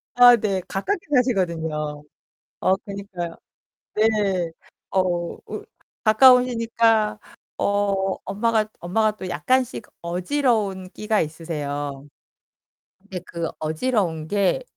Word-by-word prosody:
아, 245 0 +9
네. 200 -4 -1
가깝게 345 - -1 0.2
사시거든요. 160 - 0 0.6
어, 190 - +4
그니까요. 195 -4 -6 0.6
네. 205 -5 +2 0.4
어, 190 - +3 0.5
우 - - -6 0.4
가까우시니까 230 -2 +4 0.4
어 200 -1 +1
엄마가 215 +1 +1
엄마가 215 +4 +1
또 185 -3 -6
약간씩 240 - 0 0.2
어지러운 195 +1 0
끼가 215 0 0
있으세요. 145 -3 -4 0.9
근데 195 -2 -7
그 170 -2 -3
어지러운 160 -1 -1
게 205 - +1
200 Hz, 215 characters per minute, -23 LUFS, 170-225 Hz, 0.9 s, 아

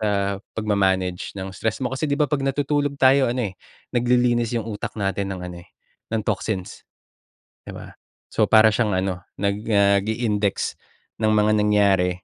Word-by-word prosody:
sa 100 -2 0 0.2
pagma-manage 95 -4 0
ng 95 0 -5
stress 110 +5 -3
mo. 125 - -2
Kasi, 145 +3 -2
'di 140 - 0
ba 150 - +4
'pag 145 -2 0
natutulog 145 +1 0
tayo 135 0 +5
ano 120 -4 -1
eh, - - -26 0.4
naglilinis 120 -1 +2
'yung 115 -2 -3
utak 105 -2 -5
natin 100 0 -1
ng 90 - -7
ano 90 - -8
eh, - - -27 0.4
ng 110 -1 0
toxins, 95 -5 -3 0.9
'di - - -6
ba? - - -10 0.4
So, - - +3
para 110 0 +7
siyang 105 -3 +1
ano, 95 -1 -2 0.2
nag 100 0 0 0.2
ah, 100 0 +5
nag-i-index 105 -2 -1 0.5
ng 110 - +3
mga 105 0 +3
nangyari, 100 -3 +3
105 Hz, 165 wpm, -23 LUFS, 100-120 Hz, 0.9 s, para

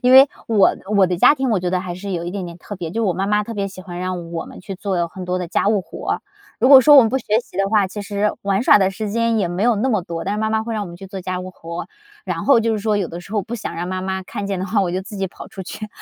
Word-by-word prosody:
因 250 0 +3
为 265 +2 +10 0.2
我 215 -4 +4 0.2
我 190 -2 +6
的 175 -1 -2
家 290 - +7
庭， 265 -2 -1
我 210 -5 +2
觉 180 - -1
得 185 0 0
还 180 -2 -5
是 195 +2 -6
有 170 -1 -2
一 175 - -4
点 190 -1 -4
点 170 0 -9
特 205 +3 -8
别， 170 -3 -5
就 225 +3 -1
我 185 - +2
妈 190 +3 -2
妈 210 0 +2
特 230 - -6
别 200 -2 -2
喜 185 -1 -11
欢 175 -1 -8
让 180 -2 -4
我 165 - -4
们 - - -11
去 195 - -6
做 185 -3 -1
很 180 +1 -8
多 180 0 -1
的 180 - -3
家 185 - +1
务 205 -3 +2
活。 - - -4 0.4
如 255 - +4
果 275 -2 +10
说 295 +3 +7
我 - - +11
们 225 - +1
不 265 - +1
学 - - -13 0.2
习 190 - -16
的 195 0 +2
话， 210 -2 +3
其 200 +3 -7
实 205 +1 -1
玩 200 +2 +1
耍 210 - +7
的 190 - +3
时 210 +2 -4
间 230 +1 +1
也 185 -5 +1
没 175 +4 -2
有 240 -1 +4
那 220 +6 0
么 215 -6 +2
多， 170 -1 -5
但 200 - -1
是 210 - -2
妈 220 - +1
妈 220 0 +1
会 230 - -5
让 215 -2 -2
我 - - -8
们 170 -1 -9
去 195 - -11
做 190 0 -7
家 185 0 -3
务 185 - -7
活， 170 -1 -7 0.4
然 - - -3
后 275 -5 +5
就 225 0 +1
是 215 - -1
说 210 0 0
有 190 -4 -1
的 170 +1 -7
时 190 +4 -13
候 210 -3 0
不 235 +5 -5
想 - - -5
让 170 +1 -3
妈 185 0 -3
妈 190 0 -3
看 200 +2 -5
见 195 -2 -2
的 185 - -2
话， 200 +2 +1
我 185 -3 0
就 185 +2 -2
自 210 +2 -9
己 195 -1 -1
跑 - - -11
出 190 - -8
去， 215 +4 -6
195 Hz, 365 characters per minute, -20 LUFS, 180-215 Hz, 0.4 s, 我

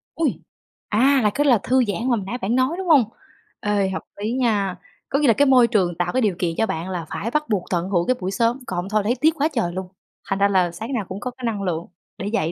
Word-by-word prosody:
Ôi! 325 -2 0 0.5
À, 265 +6 +4
là 210 - +4
cái 290 +1 +2
là 250 -4 +5
thư 255 +1 +3
giãn 200 - -1
mà 250 - -2
hồi 205 - -3
nãy 240 +6 -4
bạn 235 -1 -1
nói, 260 +5 +2
đúng 380 -1 -4
hông? 290 -7 +6 0.6
Ê, 205 -2 0
hợp 185 - -3 0.2
lý 215 +3 -1
nha! 210 -7 +1 0.3
Có 275 - +1
nghĩa 295 - +3
là 230 - +6
cái 285 +7 +3
môi 255 -3 +6
trường 185 -7 +1
tạo 175 0 0
cái 260 - +2
điều 205 -6 +1
kiện 170 -2 -1
cho 225 - +2
bạn 170 -2 -4
là 175 -3 -4
phải 230 +3 -4
bắt 300 0 -1
buộc 200 -5 +1
tận 175 0 -1
hưởng 175 -3 +1
cái 255 - +3
buổi 185 +1 -3
sớm, 235 +4 +1
còn 185 - -4
hông 185 - -4
thôi 215 0 +1
thấy 240 +4 +1
tiếc 315 +2 +4
quá 290 - +2
trời 175 -8 -1
luôn, 185 0 -4 0.4
thành 195 - 0
ra 200 - +5
là 185 -3 +2
sáng 220 +10 -6
nào 220 -6 -1
cũng 190 - -5
có 250 +3 -4
cái 250 -1 -8
năng 215 -3 -1
lượng 170 -2 -2 0.3
để 195 - -4
dậy, 170 -7 0
215 Hz, 285 wpm, -22 LUFS, 190-255 Hz, 0.6 s, hông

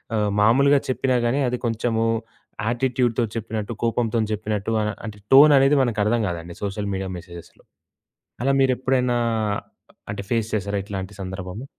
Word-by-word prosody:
ఆహ్, 105 -1 +1
మామూలుగా 140 +7 +5
చెప్పినా 130 0 0
గాని, 120 +4 +1
అది 125 - -2
కొంచెము 115 0 0 0.6
యాటిట్యూడ్‌తో 120 0 +1
చెప్పినట్టు, 110 0 -4
కోపంతోని 115 -1 0
చెప్పినట్టు 105 0 -2
అనా 105 0 0
అంటే 105 -2 -7 0.2
టోననేది 140 0 +7
మనకు 115 -4 -1
అర్థం 115 +2 +2
కాదండి 85 -1 -5
సోషల్ 100 0 -3
మీడియా 95 0 -3
మెసేజెస్‌లో. 85 -1 -13 0.8
అలా 135 +2 +2
మీరు 135 -1 +4
ఎప్పుడైనా 125 -1 +1 0.9
అంటే 100 -1 -4
ఫేస్ 115 -2 0
చేసారా 100 -1 -1
ఇట్లాంటి 95 -1 -6
సందర్భము? 95 +3 -6
110 Hz, 140 wpm, -23 LUFS, 100-125 Hz, 0.9 s, టోననేది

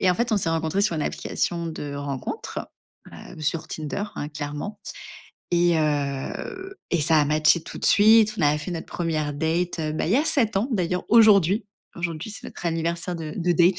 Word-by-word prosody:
Et 185 - +4
en - - +2
fait, 235 +1 0
on - - +4
s'est 175 -4 0
rencontrés 165 +4 0
sur 175 -6 +1
une 150 - -1
application 170 +2 -2
de 145 -3 -5
rencontres, 140 -2 -4 0.5
heu, - - -11
sur 155 +1 -1
Tinder, 155 +6 -4
hein, 145 - -3
clairement 150 +7 -6 0.7
et 175 -1 +4
heu 150 - -2 0.2
et 170 - +2
ça 155 +1 +4
a 145 - +3
matché 155 +3 +3
tout - - -9
de - - -5
suite. 215 +1 +6
On - - 0
a 145 +1 +4
fait 150 +4 -5
notre 165 -2 -5
1re 155 -4 -2
date, 165 +3 -1
heu, 155 -1 -1
bah 155 - -1
il 180 - +1
y - - +5
a 295 - +2
7 230 -10 +1
ans 215 +6 +1
d'ailleurs, 180 -3 0
aujourd'hui. 210 -2 +5 0.3
Aujourd'hui, 170 +2 -4
c'est 210 - -9
notre - - -10
anniversaire 170 +1 -2
de 155 -2 -6
de 175 0 0
date. 175 +2 +4
170 Hz, 205 wpm, -24 LUFS, 155-200 Hz, 0.7 s, suite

